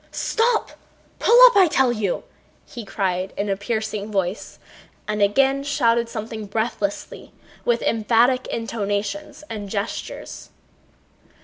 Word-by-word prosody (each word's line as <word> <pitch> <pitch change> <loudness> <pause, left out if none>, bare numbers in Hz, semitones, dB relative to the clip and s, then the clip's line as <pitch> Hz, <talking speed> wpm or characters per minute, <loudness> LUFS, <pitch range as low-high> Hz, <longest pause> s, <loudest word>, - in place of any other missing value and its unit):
"Stop! 460 0 0 0.5
Pull 475 +2 +5
up, - - +6
I 380 -3 +7
tell 265 -5 +2
you!" 210 -5 -2 0.4
he 240 -6 -8
cried 190 -2 -2
in 205 0 -2
a 195 - +1
piercing 215 0 -3
voice, 195 0 -2 0.5
and 210 0 -2
again 270 +7 +3
shouted 235 -5 +1
something 220 -1 -6
breathlessly 210 -1 -3 0.3
with 240 -1 +1
emphatic 235 +3 +2
intonations 220 +5 -3
and 210 -5 -6
gestures. 200 +2 -5
220 Hz, 115 wpm, -22 LUFS, 205-255 Hz, 0.5 s, I